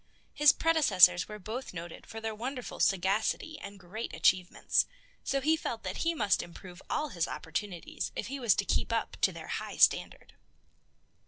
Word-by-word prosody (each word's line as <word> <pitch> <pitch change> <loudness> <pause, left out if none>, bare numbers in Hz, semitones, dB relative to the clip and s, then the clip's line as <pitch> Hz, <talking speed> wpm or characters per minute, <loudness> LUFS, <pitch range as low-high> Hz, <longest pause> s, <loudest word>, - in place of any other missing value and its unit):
His 295 0 +6
predecessors 195 - +5
were 210 - -7
both 220 +2 -6
noted 170 0 -8
for 225 - -7
their 225 0 -3
wonderful 250 +3 -6
sagacity 200 - +1
and 200 0 -9
great 195 +6 -6
achievements, 185 -1 +2 0.4
so 275 - 0
he 310 +4 +3
felt 235 -7 -5
that 185 -1 -4
he 335 0 0
must 210 -9 +2
improve 175 +1 -11
all 305 - -1
his 170 -9 -1
opportunities 175 +2 -4
if - - -3
he 275 +5 -5
was 235 -5 +3
to - - -1
keep - - 0
up - - -1
to - - +4
their - - -9
high - - -4
standard. - - +2
210 Hz, 170 wpm, -30 LUFS, 185-265 Hz, 0.4 s, His